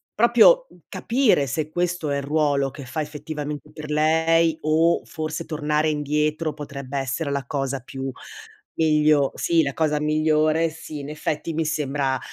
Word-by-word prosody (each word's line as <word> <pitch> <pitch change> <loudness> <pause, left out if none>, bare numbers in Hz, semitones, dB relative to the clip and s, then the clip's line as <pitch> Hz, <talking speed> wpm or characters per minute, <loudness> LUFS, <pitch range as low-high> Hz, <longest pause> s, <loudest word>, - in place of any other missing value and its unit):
proprio, 240 - +6
mhmm, - - -20
capire 235 - +2
se 150 +3 -3
questo 175 -2 -1
è 140 - 0
il 140 - -3
ruolo 145 -2 +1
che 140 -2 -9
fa 155 +5 -3
effettivamente 150 -1 -6
per 150 -1 -8
lei, 160 +1 +3
o 160 +2 +2
forse 155 -1 -5
tornare 150 0 0
indietro 150 +1 -1
potrebbe 140 -2 -6
essere 135 +3 -2
la 140 -2 -2
cosa 135 -1 -3
più 135 +2 -6 0.7
miglio 150 -3 +3
sì, 170 -1 +2
la 140 -3 -1
cosa 150 -2 0
migliore 155 +1 +2
sì, 155 -1 -8
in 140 +1 -7
effetti 155 +1 -3
mi 160 +1 -1
sembra 140 -3 -1
150 Hz, 155 wpm, -23 LUFS, 145-160 Hz, 0.7 s, proprio